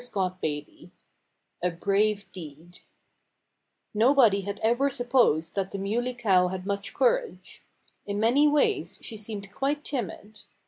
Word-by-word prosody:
(Page 245 - -8
100)] 185 -2 0
XXI 150 -1 -5 0.7
A 180 - +1
BRAVE 200 +3 0
DEED 165 0 -11 1.1
Nobody 225 -2 +4
had 200 +1 -5
ever 240 +5 +3
supposed 245 - +2
that 195 -1 -2
the 200 - -5
Muley 235 +6 -2
Cow 190 -6 +3
had 185 0 -5
much 200 0 -3
courage. - - -1 0.5
In 200 0 -2
many 250 +7 +4
ways 300 +8 +1
she 225 - -7
seemed 205 -2 -7
quite 290 +4 -1
timid. 215 - -5
205 Hz, 135 wpm, -27 LUFS, 190-245 Hz, 1.1 s, Nobody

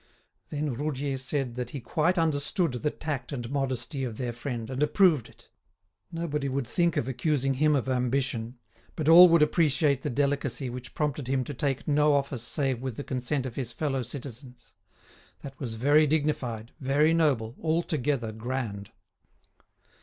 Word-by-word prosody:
Then 150 -2 -2
Roudier 140 +1 -2
said 130 -1 -2
that 125 0 -4
he 140 - -6
quite 160 +8 0
understood 165 +2 +1
the 125 +5 -1
tact 145 -2 -5
and 120 -4 -4
modesty 135 0 -2
of 115 -4 -4
their 120 -2 -3
friend, 120 -2 -5
and 130 +2 -3
approved 155 - +3
it. - - -20 0.6
Nobody 150 -4 -2
would 135 0 -1
think 170 +6 +1
of 120 - 0
accusing 135 0 0
him 150 +3 +3
of 130 -2 -1
ambition, 125 -2 -1 0.4
but 155 - -3
all 175 +2 +10
would 165 -2 +5
appreciate 150 -3 +2
the 150 - -2
delicacy 140 -1 -1
which 125 0 -8
prompted 145 -3 -2
him 130 0 +1
to 145 - -6
take 135 0 -2
no 150 0 +4
office 140 -3 0
save 130 +1 -1
with 130 -4 -4
the 145 - -4
consent 130 +1 -2
of 130 - -5
his 120 -2 -4
fellow 135 0 -1
citizens. 125 0 -9 0.7
That 135 -1 -10
was 115 -4 -4
very 145 +6 +4
dignified, 135 -7 -1
very 145 +3 +3
noble, 135 -8 +1
altogether 150 -7 0
grand. 110 -3 -4
135 Hz, 160 wpm, -28 LUFS, 125-150 Hz, 0.7 s, all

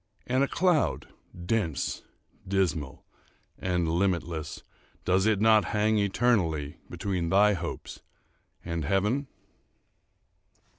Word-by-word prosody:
—and 130 +2 +2
a - - +2
cloud, 175 -2 +1 0.4
dense, 95 -8 -1 0.5
dismal, 80 -8 -1 0.5
and 90 -2 0
limitless, 85 -2 -1 0.4
does 95 +3 +3
it 110 -3 +2
not 110 -1 +5
hang 105 +1 +2
eternally 95 -8 +1
between 90 -4 -2
thy 105 +3 +5
hopes 85 -2 -6 0.6
and 85 -2 -3
heaven? 105 - 0
95 Hz, 95 wpm, -28 LUFS, 85-110 Hz, 0.6 s, not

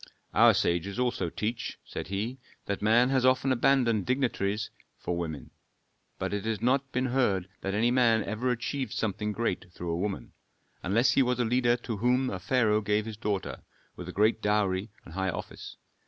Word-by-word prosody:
"Our - - +6
sages 85 +3 0
also 120 -8 0
teach," 115 +7 -3
said - - -6
he, 105 +7 -3 0.3
"that 100 - -3
man 115 +4 +4
has 130 -2 +2
often 130 +1 +3
abandoned 120 -5 +2
dignities 110 -5 0 0.3
for 90 - -3
woman, 80 -6 -5 0.7
but - - -3
it 105 -1 -2
has 110 -2 -1
not 130 +4 +1
been 130 +1 0
heard 120 -8 +1
that 95 +1 -2
any 115 +3 +3
man 115 -4 +4
ever 110 +6 -2
achieved 125 +3 -2
something 105 0 -2
great 100 -4 -2
through 85 0 -5
a 85 - -1
woman; 95 -8 -3 0.5
unless 115 +8 +3
he - - +4
was 125 -1 +1
a 120 - +2
leader 120 +1 +2
to 115 -3 -5
whom 125 +4 +2
a 95 - -4
pharaoh 110 +1 +2
gave 105 +1 0
his 110 -1 -6
daughter, 105 -2 -3 0.3
with - - -8
a - - -4
great 110 +2 +2
dowry 105 -1 +1 0.2
and 80 - -12
high 95 +1 -1
office. - - -7
110 Hz, 185 wpm, -28 LUFS, 100-125 Hz, 0.7 s, Our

